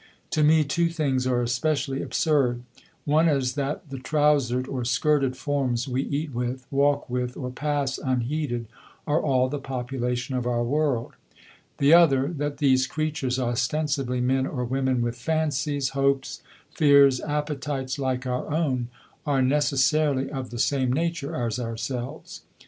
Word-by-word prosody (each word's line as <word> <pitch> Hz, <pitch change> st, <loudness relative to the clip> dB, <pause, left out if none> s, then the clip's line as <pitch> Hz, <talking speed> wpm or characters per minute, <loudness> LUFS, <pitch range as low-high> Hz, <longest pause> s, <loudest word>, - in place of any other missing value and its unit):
To 155 Hz, -, +1 dB
me 155 Hz, +1 st, +5 dB
two 170 Hz, +4 st, +1 dB
things 140 Hz, -6 st, 0 dB
are 125 Hz, -1 st, +1 dB
especially 135 Hz, +3 st, -1 dB
absurd: 130 Hz, -6 st, +1 dB, 0.4 s
one 155 Hz, +3 st, +3 dB
is 135 Hz, -4 st, +1 dB
that 145 Hz, +3 st, -3 dB
the 135 Hz, -, -5 dB
trousered, 135 Hz, -3 st, +1 dB
or 130 Hz, -3 st, -3 dB
skirted, 130 Hz, +2 st, +1 dB
forms 135 Hz, -3 st, -1 dB
we 130 Hz, 0 st, -1 dB
eat 145 Hz, +1 st, -3 dB
with, 125 Hz, +2 st, -3 dB
walk 140 Hz, +1 st, +2 dB
with, 125 Hz, 0 st, -3 dB
or 125 Hz, -2 st, -4 dB
pass 140 Hz, -1 st, -2 dB
unheeded, 130 Hz, -1 st, -2 dB, 0.4 s
are 150 Hz, +2 st, +1 dB
all 130 Hz, -3 st, +2 dB
the 145 Hz, +2 st, -4 dB
population 125 Hz, -1 st, -3 dB
of 125 Hz, -1 st, -1 dB
our 120 Hz, -1 st, 0 dB
world; 135 Hz, -2 st, 0 dB, 0.6 s
the 140 Hz, +3 st, +4 dB
other, 140 Hz, -5 st, +5 dB
that 145 Hz, 0 st, -2 dB
these 130 Hz, -3 st, +3 dB
creatures, 150 Hz, -4 st, -2 dB
ostensibly 125 Hz, +1 st, -1 dB
men 130 Hz, +1 st, +1 dB
or 125 Hz, -4 st, -3 dB
women 130 Hz, -1 st, 0 dB
with 120 Hz, 0 st, -3 dB
fancies, 145 Hz, -1 st, -1 dB
hopes, 135 Hz, 0 st, 0 dB, 0.3 s
fears, 140 Hz, -3 st, +5 dB
appetites 145 Hz, -2 st, -3 dB
like 130 Hz, -1 st, -1 dB
our 125 Hz, +3 st, -3 dB
own, 135 Hz, -6 st, 0 dB, 0.4 s
are 135 Hz, -2 st, +2 dB
necessarily 140 Hz, 0 st, +2 dB
of 130 Hz, -3 st, -5 dB
the 120 Hz, -, -7 dB
same 130 Hz, 0 st, +1 dB
nature 165 Hz, 0 st, -2 dB
as 120 Hz, -1 st, -2 dB
ourselves. 120 Hz, +1 st, -5 dB
135 Hz, 145 wpm, -25 LUFS, 125-145 Hz, 0.6 s, me